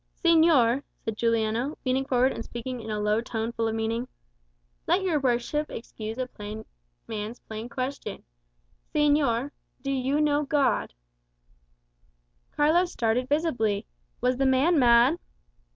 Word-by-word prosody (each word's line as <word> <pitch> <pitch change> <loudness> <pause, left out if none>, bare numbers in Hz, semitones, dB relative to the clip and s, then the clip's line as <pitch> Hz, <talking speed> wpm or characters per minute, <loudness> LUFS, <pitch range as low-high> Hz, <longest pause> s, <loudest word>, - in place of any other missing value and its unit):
"Señor," 315 -7 +5 0.2
said 225 - -2
Juliano, 230 +4 0
leaning 260 +1 +1
forward 255 0 +3
and 230 - -5
speaking 240 +1 -6
in 220 - -8
a 210 -1 -2
low 210 +2 +1
tone 230 -1 -3
full 230 -1 -1
of 220 - -1
meaning. 225 +2 -2 0.8
"Let 380 - +2
your 340 -5 +1
worship 265 +4 0
excuse 225 -1 -7
a 255 - -1
plain 215 -2 -8 0.4
man's 215 +2 -5
plain 220 +2 -7
question 255 -4 -5 0.7
Señor, 290 -3 +2 0.3
do 275 - -1
you 270 +2 0
know 295 -1 +2
God?" 275 - +1 1.6
Carlos 335 +4 +3
started 235 +3 0
visibly. 245 -10 0 0.4
Was 250 0 +1
the 270 0 +2
man 285 +6 +4
mad? 245 +6 +5
250 Hz, 135 wpm, -27 LUFS, 225-290 Hz, 1.6 s, Señor